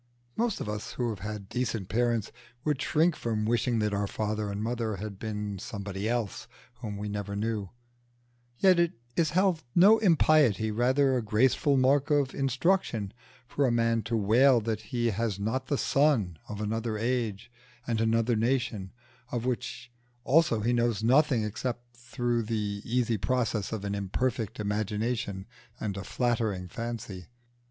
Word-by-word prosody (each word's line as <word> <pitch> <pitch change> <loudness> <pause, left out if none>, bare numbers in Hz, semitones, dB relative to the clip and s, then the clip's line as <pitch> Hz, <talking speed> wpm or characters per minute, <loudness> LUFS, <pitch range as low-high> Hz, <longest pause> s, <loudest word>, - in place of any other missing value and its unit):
Most 230 -2 0
of - - -4
us 105 0 -4
who 120 -2 -1
have 105 -4 -5
had 105 0 -6
decent 115 -4 -2
parents 120 -1 0 0.3
would 150 -3 0
shrink 160 +3 +2
from 110 -2 -2
wishing 120 +1 +1
that 105 -1 0
our 100 0 0
father 105 0 -2
and 100 +1 -3
mother 115 -2 -2
had 100 0 -7
been 105 -2 -4
somebody 100 -1 -4
else 115 -5 -2 0.3
whom 105 -4 -5
we 105 +1 -4
never 100 0 -4
knew; 105 -2 -2 0.9
yet 185 +2 +5
it 170 -1 +2 0.2
is 165 -2 +2
held 185 -5 +2
no 205 +6 +7
impiety, 155 - +4
rather, 130 +4 +2
a 125 - +1
graceful 130 +6 +2
mark 135 +3 +3
of 145 -3 +2
instruction, 135 - 0 0.3
for 140 +2 +1
a - - +2
man 115 -1 +2
to 115 +1 -1
wail 120 +5 +5
that 110 -1 -2
he 120 -2 0
was 115 -4 0
not 110 +6 -2
the 145 - 0
son 125 - +2
of 105 -1 -5
another 110 +1 -2
age 115 -1 -2 0.3
and 115 -2 0
another 115 +1 +2
nation, 115 -4 -1 0.4
of 120 -1 -2
which 125 0 -3 0.3
also 145 -7 +3
he 120 +3 +1
knows 120 -3 +1
nothing 130 -1 +4
except 120 +3 -4
through 120 0 -1
the 105 -2 -2
easy 120 -2 0
process 115 -3 0
of 110 -3 -4
an 100 - -2
imperfect 110 +3 -2
imagination 105 -1 -2 0.3
and 100 -3 -3
a 100 - -5
flattering 110 -5 -1
fancy. 115 -3 -6
115 Hz, 160 wpm, -28 LUFS, 105-125 Hz, 0.9 s, no